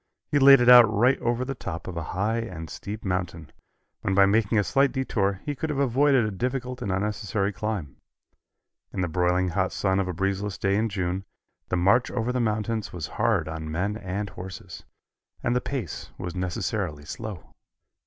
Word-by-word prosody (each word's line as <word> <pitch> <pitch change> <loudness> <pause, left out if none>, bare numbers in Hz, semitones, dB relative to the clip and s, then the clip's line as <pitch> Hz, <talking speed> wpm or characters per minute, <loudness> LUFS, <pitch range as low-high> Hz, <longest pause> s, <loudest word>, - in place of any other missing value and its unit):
He 145 - +3
laid 135 -1 +8
it 120 - +2
out 120 -3 +9
right 120 +5 +3
over 120 +2 0
the 135 - -3
top 90 -9 -6
of 90 - -5
a 85 - -2 0.2
high 110 +4 +1
and 90 -8 -6
steep 105 +2 -7
mountain, 90 -4 -3 0.5
when 95 - 0
by 100 0 +7
making 110 +2 +2
a 105 - +4
slight 135 +6 +2
detour, 100 -7 -1
he 145 - -1
could 155 +3 -4
have 150 - -2
avoided 135 -1 +3
a 105 - -2
difficult 125 +4 -3
and 100 - -2
unnecessary 105 +1 -1
climb. 100 -10 -4 0.9
In 95 - -3
the 90 - 0
broiling 90 +2 +1
hot 95 +1 0
sun 95 -1 0
of 95 - 0
a - - -1
breezeless 95 +1 -2
day 100 +2 +1
in 110 +2 +1
June, 95 -1 -2 0.5
the 90 - +1
march 100 +8 +3
over 125 0 -1
the 125 - -1
mountains 110 -1 -1
was 85 -4 -5 0.2
hard - - +2
on 80 0 -5
men 95 +6 -1
and 100 -1 -4
horses, 90 0 -9 0.6
and 120 - +1
the 125 - +2
pace 120 - -5
was 90 -1 -5
necessarily 90 -3 -3
slow. 105 +2 -7
100 Hz, 190 wpm, -26 LUFS, 90-120 Hz, 0.9 s, out